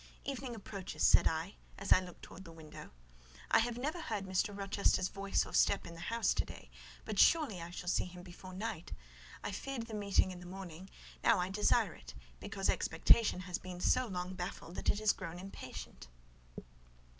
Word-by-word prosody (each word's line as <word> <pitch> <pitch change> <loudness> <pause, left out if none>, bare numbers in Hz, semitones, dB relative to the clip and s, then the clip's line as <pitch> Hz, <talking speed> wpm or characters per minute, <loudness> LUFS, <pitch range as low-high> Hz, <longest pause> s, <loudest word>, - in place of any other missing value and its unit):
"Evening 265 -3 -4
approaches," 195 -3 -5
said - - +7
I, 160 +4 -2 0.2
as 195 - -5
I - - +6
looked 180 -2 -10
towards 190 - -10
the 165 - -11
window. 160 -2 -10 0.6
"I - - +7
have 235 +1 0
never 300 +7 -2
heard 210 -9 -3
Mr. 190 +2 0
Rochester's 195 -2 +1
voice 195 0 0
or - - -10
step 200 - +4
in 170 - -8
the 165 - -10
house 230 +7 +1
to - - +1
day; - - -11 0.3
but - - -2
surely 280 - +5
I 170 - -6
shall 175 0 -7
see - - +2
him 180 0 -10
before 185 +1 -10
night: 210 -3 -4 0.5
I - - -2
feared 240 +4 -4
the 225 - -9
meeting 200 -2 +2
in 180 - -8
the 180 - -10
morning; 185 -1 -8 0.3
now 230 - +6
I 180 +1 0
desire 205 +2 +3
it, - - -12 0.2
because - - -2
expectation 220 -5 +4
has 180 -1 -3
been 180 -1 -7
so 255 +7 +3
long 180 -2 -3
baffled 175 -2 -5
that - - 0
it 205 - +2
is 215 -1 +4
grown 175 -2 -6
impatient." 180 - -8
190 Hz, 190 wpm, -35 LUFS, 180-215 Hz, 0.6 s, said